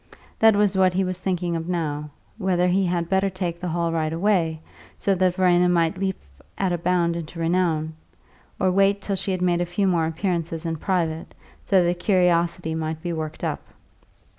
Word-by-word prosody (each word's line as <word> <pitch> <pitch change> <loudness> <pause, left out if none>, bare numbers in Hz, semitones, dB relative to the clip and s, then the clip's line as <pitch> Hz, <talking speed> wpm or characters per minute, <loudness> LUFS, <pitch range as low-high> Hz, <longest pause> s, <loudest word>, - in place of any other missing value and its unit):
That 220 -1 +6
was 205 -1 +2
what 185 -1 +3
he 190 - +2
was 185 -1 -3
thinking 180 -2 -1
of 165 +1 -4
now, 150 -4 -2 0.3
whether 180 -2 +1
he 190 +1 +2
had 170 -1 -1
better 190 +2 +1
take 180 -2 -4
a 180 - -3
hall 170 0 -1
right 160 -1 -1
away, 165 -2 +1 0.4
so 200 - +1
that 185 -1 +1
Verena 180 -1 +3
might 170 0 +1
leap 190 -1 -2 0.4
at 190 -2 0
a 175 - -1
bound 170 -1 +1
into 170 0 -7
renown, 165 -2 0 0.7
or 185 -1 +2
wait 195 +1 +3
till 200 0 -2
she 195 - -4
had 185 -1 -1
made 175 -1 +2
a - - +1
few 180 +3 0
more 170 -4 +2
appearances 165 -1 -2
in 165 -1 -2
private, 165 -2 -2 0.3
so 190 -3 +3
that 175 0 0
curiosity 175 -3 +1
might 160 0 -4
be 175 -1 -2
worked 155 -1 -5
up. - - -2
175 Hz, 190 wpm, -23 LUFS, 165-185 Hz, 0.7 s, That